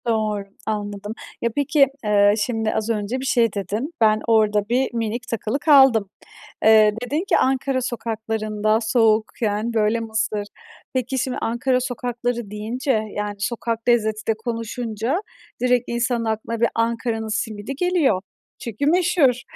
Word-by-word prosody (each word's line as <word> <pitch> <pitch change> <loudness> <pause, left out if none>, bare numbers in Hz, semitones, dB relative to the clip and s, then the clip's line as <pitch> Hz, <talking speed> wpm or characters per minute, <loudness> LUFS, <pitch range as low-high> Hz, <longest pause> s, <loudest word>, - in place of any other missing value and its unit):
Doğr 215 -3 0 0.2
anladım. 205 -1 -4 0.3
Ya 235 - +1
peki, 285 0 +3 0.2
eee, 205 -1 +4
şimdi 225 -3 -1
az 220 +1 -2
önce 220 +3 -1
bir 265 - -5
şey 235 -5 +2
dedin. 210 - -3
Ben 215 -1 +4
orada 210 -2 +3
bir 250 +1 +1
minik 230 0 -3
takılı 230 +3 -2
kaldım. 265 - +5 0.5
Eee, 215 -1 +6
dedin 295 +7 -1
ki - - +4
Ankara 265 0 +1
sokaklarında 220 -2 -1
soğukken 220 -1 +1
böyle 220 +1 +2
mısır. 220 -2 -2 0.5
Peki 255 0 -1
şimdi 255 +1 -2
Ankara 250 +3 +1
sokakları 245 -3 -3
deyince, 230 +6 -2 0.2
yani 210 0 -3
sokak 230 +3 -3
lezzeti 220 -2 +1
de 225 - +3
konuşunca 230 - -3 0.4
direkt 250 -1 +3
insanın 235 0 0
aklına 220 +1 -2
bir 235 - +4
Ankara'nın 230 -1 -1
simidi 220 +3 -3
geliyor 310 - +2 0.4
çünkü 235 +4 -3
meşhur. 315 -6 +3
230 Hz, 135 wpm, -22 LUFS, 215-250 Hz, 0.5 s, Eee